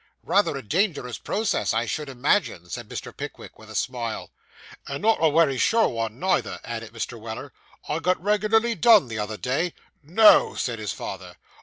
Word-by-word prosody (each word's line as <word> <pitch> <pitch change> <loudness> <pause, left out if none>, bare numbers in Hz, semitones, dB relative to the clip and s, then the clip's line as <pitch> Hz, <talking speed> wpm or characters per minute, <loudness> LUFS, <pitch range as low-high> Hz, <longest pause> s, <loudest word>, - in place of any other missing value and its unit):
'Rather 200 -8 +2
a 135 - -7
dangerous 150 - -1
process, 210 - -1
I 115 +1 +1
should 150 +5 -4
imagine,' 125 - 0
said 120 -3 -6
Mr. - - -7
Pickwick, - - -8
with - - -14
a - - -9
smile. 120 -3 -3 0.6
'And 140 +5 -5
not 225 +1 +3
a 160 - +5
wery 145 -4 +3
sure 225 0 +4
one, 115 -1 -3
neither,' 190 +3 0
added 115 -2 -6
Mr. 115 +1 -5
Weller; 110 0 -7 0.3
'I 150 - -1
got 180 +2 +1
reg'larly 215 +4 +2
done 220 - +5
the 115 -1 -4
other 105 +1 -3
day.' 140 - -1 0.3
'No!' 200 +9 +6
said 115 -3 -2
his 105 -2 -3
father. - - -7
140 Hz, 175 wpm, -25 LUFS, -, 0.6 s, No